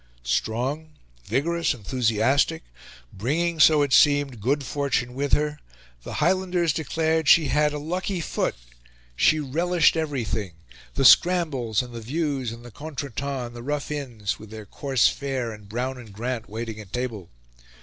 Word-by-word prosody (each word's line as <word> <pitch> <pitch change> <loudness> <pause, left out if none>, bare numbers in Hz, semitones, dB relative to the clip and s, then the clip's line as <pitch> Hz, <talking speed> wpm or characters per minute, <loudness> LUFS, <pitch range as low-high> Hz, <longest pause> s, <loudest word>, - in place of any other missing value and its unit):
Strong, 130 - -2 0.3
vigorous, 165 - 0
enthusiastic, 120 - +1 0.5
bringing, 160 - -1
so 155 -2 +6
it 140 -2 -1
seemed, 145 -6 +4
good 140 +6 +1
fortune 130 -3 -1
with 140 +2 -3
her 150 0 +1 0.4
the - - -8
Highlanders 180 -4 +1
declared 160 +1 0
she 155 -2 +6
had 150 +1 +2
"a 150 - -4
lucky 180 +5 -3
foot" 165 - -1 0.6
she 155 - +4
relished 165 +6 +2
everything 120 - -2 0.4
the 135 - +1
scrambles 135 - +4
and 125 -1 -11
the 115 - -6
views 135 -1 -2
and 115 +1 -10
the 120 - -10
contretemps 140 -1 -5
and 120 0 -10
the 120 - -7
rough 145 +3 -3
inns 120 -8 -4
with 110 - -11
their 110 -1 -9
coarse 135 +4 +1
fare 135 -4 -2
and 105 -2 -12
Brown 125 +4 -3
and 115 -4 -12
Grant 120 +2 -4
waiting 110 0 -5
at 100 -3 -11
table. 115 -8 -4
135 Hz, 150 wpm, -25 LUFS, 115-150 Hz, 0.6 s, so